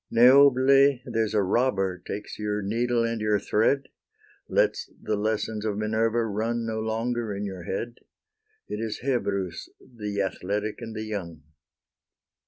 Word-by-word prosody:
Neobule, 135 +2 +6
there's 115 -3 -1
a 105 - +3
robber 95 -3 +1
takes 105 +2 -7
your 105 -1 -2
needle 120 +3 +1
and 115 -1 -2
your 105 -1 +2
thread, 110 +7 +1 0.7
Lets - - +1
the 110 - -1
lessons 110 0 -1
of 105 -2 -1
Minerva 110 +2 +1
run 115 +2 -1
no 110 -1 -2
longer 115 0 -2
in 100 +1 -3
your 95 -3 -6
head; 120 +7 -4 0.7
It 105 - -4
is 110 -1 -4
Hebrus, 100 -10 -2
the 105 -5 -6
athletic 100 +3 -2
and 115 -1 -7
the 110 - -3
young! 85 -8 -6
110 Hz, 140 wpm, -26 LUFS, 105-120 Hz, 0.7 s, Neobule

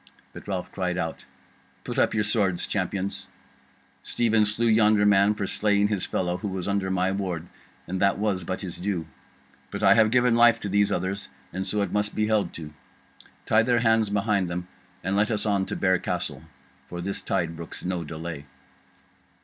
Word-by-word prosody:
But - - -11
Ralph 95 -3 -3
cried 90 -2 -2
out: 80 -3 -4 0.6
"Put - - -3
up - - +2
your 105 - +2
swords, 100 -4 +1
Champions! 100 0 -3 0.7
Stephen 110 - +2
slew 105 +3 0
yonder 110 -2 +4
man 100 +1 +4
for 105 - -2
slaying 105 +1 +1
his 100 -4 -1
fellow, 90 -1 -1
who 95 - -5
was 95 -2 -4
under 100 -1 0
my 95 0 +1
ward, 90 -4 -3 0.4
and 95 +1 -4
that 100 0 +3
was 100 -3 -1
but 95 +2 -4
his 90 -4 -6
due. 90 -3 -2 0.6
But - - -5
I - - +7
have 110 -1 +5
given 125 0 +3
life 120 0 +5
to 100 - -3
these 100 +1 +2
others, 95 +3 -2 0.2
and 95 +2 -3
so 105 +2 +2
it - - -3
must 105 0 0
be 110 - +1
held 105 -5 +1
to. 75 -2 -8 0.7
Tie 110 - +4
their 120 0 +2
hands 110 -2 +3
behind 100 -2 +1
them 90 +1 -4 0.4
and 95 +2 -1
let 105 +1 +2
us 110 -2 -1
on 100 -2 +1
to - - -3
Bear 95 -1 +2
Castle. - - -3 0.5
For 85 - -7
this 100 +3 -3
tide 85 -4 -1
brooks 85 +1 -8
no 90 -2 -2
delay." 80 -1 -7
100 Hz, 190 wpm, -26 LUFS, 90-105 Hz, 0.7 s, I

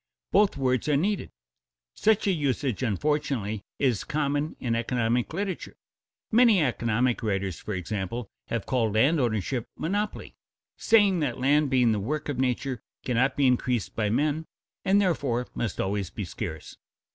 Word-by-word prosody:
Both 205 -4 +4
words 130 0 +1
are 145 - +4
needed. 200 +6 -1 0.6
Such 220 - +2
a 200 - +3
usage 140 - -1
unfortunately 115 -3 -1 0.2
is 125 -7 +1
common 150 +1 -1
in 120 -2 -1
economic 120 0 0
literature. 195 +3 -4 0.6
Many 225 -6 +5
economic 120 -1 +1
writers, 100 -4 -2
for 105 - -4
example, 100 +5 -4 0.2
have 115 -3 -2
called 115 -5 0
landownership 120 - +1
monopoly, 205 +5 -2 0.4
saying 205 -5 +4
that 135 -6 -1
land 145 +3 +3
being 125 -3 +4
the 105 - 0
work 150 +9 -3
of 135 -3 -3
nature 130 -1 -1 0.2
cannot 125 +2 +1
be 140 - +3
increased 125 -3 +1
by 105 -2 0
men, 150 +7 0 0.4
and 195 +1 +4
therefore 140 -11 0
must 120 - -3
always 100 -2 -1
be 105 - -5
scarce. 85 -4 -6
130 Hz, 145 wpm, -27 LUFS, 115-150 Hz, 0.6 s, Many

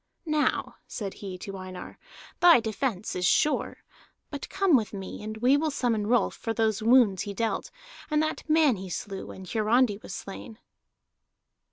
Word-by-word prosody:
"Now," 305 -2 0
said 200 -4 -5
he 190 -3 -7
to 195 +1 -7
Einar, 185 -1 -9 0.4
"thy 345 -6 +8
defence 220 -2 -3
is 180 - -2
sure. 300 - +1 0.5
But 285 -2 -6
come 390 -6 +3
with 220 -5 +1
me, 195 -2 -7
and 215 +1 -6
we 250 +5 +4
will 315 +2 0
summon 230 -7 0
Rolf 240 +1 +2
for 225 -2 -4
those 220 -1 +1
wounds 225 -5 +4
he 200 -1 -5
dealt, 225 +2 -2 0.4
and 300 -1 +2
that 310 0 -4
man 305 -7 +4
he 190 0 -7
slew, 195 +2 -5
when 190 - -9
Hiarandi 220 +1 +2
was 180 - -7
slain." 200 +4 -8
220 Hz, 165 wpm, -27 LUFS, 195-265 Hz, 0.5 s, thy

